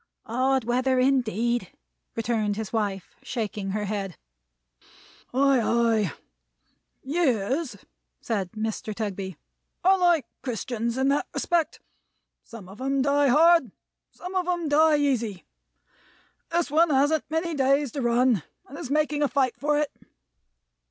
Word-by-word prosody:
"Hard 260 +2 +1
weather 255 +3 +1
indeed," 240 -5 +1 0.4
returned 220 -2 0
his 220 0 -5
wife, 200 -5 -2
shaking 215 -7 -4
her 210 +2 -2
head. 195 -3 -4 1.1
"Ay, 270 0 +3
ay! 225 -5 +2 0.9
Years," 265 - 0 0.4
said 195 -6 -3
Mr. 215 -1 -4
Tugby, 195 -5 -4 0.5
"are 380 +1 +5
like 345 -5 +3 0.2
Christians 235 -1 -3
in 265 +1 +2
that 285 - +1
respect. 340 -3 0 0.6
Some 230 -6 -11
of 195 +6 -12
'em 270 0 +1
die 285 0 +3
hard; 315 - +5 0.4
some 360 +1 -9
of 370 -2 0
'em 350 -3 -1
die 305 +1 +5
easy. 235 -9 -1 1.0
This 335 -3 0
one 325 +2 +4
hasn't 290 +2 +2
many 325 +2 -1
days 275 -1 +2
to 280 - -4
run, 240 -3 +3 0.3
and 280 - -10
is 255 - -6
making 300 0 +1
a 290 - +3
fight 260 -1 +1
for 295 +1 0
it. 295 -1 0
260 Hz, 130 wpm, -26 LUFS, 220-290 Hz, 1.1 s, are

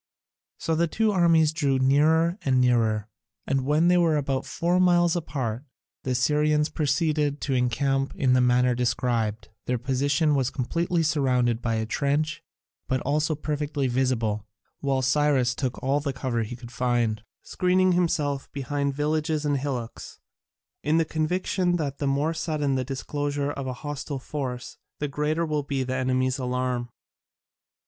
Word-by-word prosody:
So 165 - -2
the 170 +2 +2
two 220 +6 +1
armies 165 -4 +4
drew 140 -4 +1
nearer 160 +7 +3
and 130 -2 +2
nearer, 115 -4 +2 0.4
and 135 -1 0
when 155 +3 +3
they 180 0 +5
were 165 -3 +3
about 135 -2 -2
four 175 +6 0
miles 175 -2 +4
apart, 130 -7 -3 0.4
the - - -5
Assyrians 150 +4 +2
proceeded 150 0 0
to 135 - -1
encamp 135 +2 0
in 130 -2 +2
the 130 - +4
manner 125 0 +3
described: 120 -3 -1 0.2
their 125 - +1
position 140 +5 +1
was 135 -3 +1
completely 165 +7 -1
surrounded 125 -6 +1
by 115 -1 -1
a 110 0 -1
trench, 150 +6 -1 0.4
but 130 -1 0
also 150 +3 0
perfectly 150 -1 -2
visible, 120 -5 0 0.3
while 135 -2 0
Cyrus 135 -2 +2
took 130 -1 -3
all 135 +2 +2
the 140 -1 -3
cover 125 -2 -2
he 115 +2 -4
could 120 -1 -11
find, 120 -4 0 0.2
screening 185 0 +2
himself 155 -6 0
behind 140 0 -2
villages 150 +1 0
and 145 -1 +1
hillocks, 130 -4 -5 0.6
in 155 +2 +1
the 165 - +3
conviction 175 +3 0
that 145 -5 -3
the 140 - -1
more 145 +4 +1
sudden 155 -4 -1
the 130 -1 0
disclosure 145 +2 -3
of 140 -2 -5
a 130 - -2
hostile 145 -1 -4
force 130 -2 -5 0.2
the 145 - -2
greater 150 +3 -1
will 150 -2 -1
be 140 -2 -2
the 130 0 -3
enemy's 130 +1 0
alarm. 125 -1 -2
140 Hz, 155 wpm, -25 LUFS, 125-155 Hz, 0.6 s, they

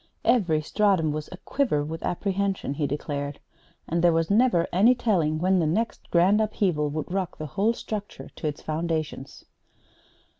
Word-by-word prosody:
"Every 170 -10 +3
stratum 190 -4 +2
was 150 0 -5
aquiver 185 - -1
with 160 +2 -6
apprehension," 195 -3 -1
he 145 0 -1
declared; 145 0 -4 0.5
"and 170 +1 0
there 175 - +6
was 165 +2 0
never 215 -6 +3
any 220 +8 +5
telling 170 -10 +1
when 185 +3 +2
the 160 - +1
next 220 +9 -2
grand 185 +5 +4
upheaval 185 -8 0
would 155 +3 -4
rock 190 -3 -2
the 155 - -5
whole 200 +10 +1
structure 210 -3 -6
to 155 - -3
its 150 - -5
foundations." 155 -3 -3
170 Hz, 155 wpm, -26 LUFS, 155-200 Hz, 0.5 s, there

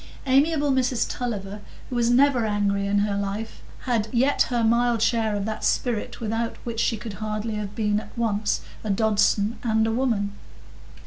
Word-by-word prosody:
Amiable 285 +2 +3
Mrs 255 -2 +1
Tulliver, 205 -4 -4 0.3
who - - -2
was 235 -1 +2
never 255 0 +4
angry 200 -1 0
in 200 +1 +1
her 205 -1 -1
life, 200 +2 -4 0.2
had 230 -4 0
yet 260 +4 +2
her 240 -2 +1
mild 235 0 +2
share 225 -2 +1
of 200 -1 -2
that 220 0 -4
spirit 235 -4 -1
without 225 +1 -2
which 230 -2 -4
she 230 0 +1
could 220 -1 -7
hardly 215 +1 -3
have 210 -1 -5
been 210 -2 +1
at 215 - -12
once 215 -3 0 0.2
a 215 - -4
Dodson 210 +1 +2
and 220 -2 +2
a 225 - 0
woman. 225 -5 0
225 Hz, 175 wpm, -24 LUFS, 210-240 Hz, 0.3 s, never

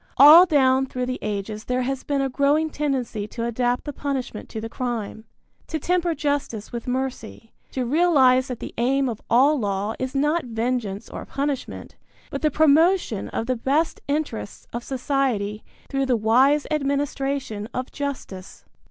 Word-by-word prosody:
All 310 +7 +10
down 265 -4 +3
through 250 -1 -3
the 255 0 -3
ages 210 +1 -4
there 250 0 0
has 270 +1 -3
been 280 -1 0
a 270 - +1
growing 290 +4 +1
tendency 260 -8 -2
to 230 +2 -4
adapt 245 +1 0
the 290 - -5
punishment 265 -6 -4
to 220 - -5
the 225 - -5
crime, 225 -3 -4 0.4
to 320 - -2
temper 345 +1 0
justice 280 -7 -2
with 235 0 -6
mercy, 250 -3 -4 0.2
to 255 -2 -1
realize 265 -3 +4
that 250 -3 -5
the - - -6
aim 270 +3 +2
of 225 -3 -4
all 275 +5 +4
law 205 0 -1
is 260 +1 -4
not 300 +4 +1
vengeance 225 -3 -2
or - - -7
punishment, 280 -1 -4 0.3
but - - -4
the 305 - +3
promotion 315 - +3
of 225 - -3
the 255 +1 0
best 280 +7 0
interests 285 -8 -3
of 235 +1 -4
society 250 -6 -1 0.2
through 270 -1 -1
the 250 -2 +2
wise 260 +7 +3
administration 275 -6 -2
of 255 0 -4
justice. 260 -10 -6
260 Hz, 160 wpm, -23 LUFS, 230-285 Hz, 0.4 s, All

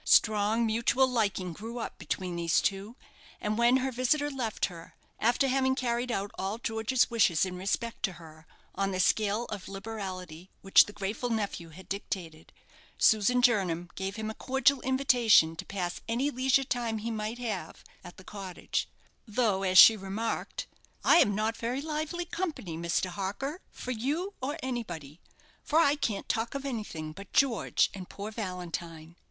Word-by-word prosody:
Strong 215 +2 +4
mutual 235 +4 +2
liking 205 -7 -1
grew 225 +6 -7
up 235 - -5
between 180 +1 -3
these 170 -1 +2
two, 200 +4 -2 0.4
and 210 0 -1
when 235 +3 +4
her 265 0 -1
visitor 285 +4 +1
left 245 -6 -1
her 170 -3 -10 0.2
after 240 +5 +3
having 265 0 +2
carried 245 -1 -1
out 200 -2 -2
all 195 +3 -2
George's 230 +2 +1
wishes 195 -8 +3
in 185 -1 -5
respect 200 +5 -2
to 195 - 0
her, 160 -1 -14 0.3
on 195 0 0
the 185 -1 -3
scale 210 +4 +2
of 205 -3 -6
liberality 190 -4 -7
which 195 - +7
the - - -9
grateful 210 +4 -3
nephew 205 -7 -2
had 180 +4 -13
dictated 175 -5 -5 0.5
Susan 225 +4 +4
Jernam 180 -8 +2
gave 195 +1 -4
him 220 -1 -3
a - - -7
cordial 265 +2 +2
invitation 245 -10 +4
to - - -7
pass 180 -3 -3
any 250 +6 0
leisure 265 +1 +2
time 240 -3 -2
he 225 +2 -4
might 215 +1 -3
have 225 -9 -5 0.2
at 175 - -11
the 185 - -12
cottage, 195 -2 -4 0.4
though, 210 -3 +1
as 185 -1 +2
she 225 - +11
remarked 210 +3 -3 0.4
"I - - +6
am 205 - +4
not 220 +2 0
very 240 +3 -2
lively 310 +3 -3
company, 325 - -4
Mr. 170 +2 -1
Harker, 210 - -4
for 250 - -6
you 295 - -2
or 285 +5 -2
anybody, 175 - -5 0.4
for 305 - 0
I 295 -3 +5
can't 225 -8 -2
talk 225 +3 -1
of 275 0 -4
anything 210 - -4
but 195 +4 -11
George 265 -5 +2
and 185 -2 -8
poor 205 +2 -6
Valentine." 170 -5 -6
215 Hz, 165 wpm, -29 LUFS, 190-245 Hz, 0.5 s, she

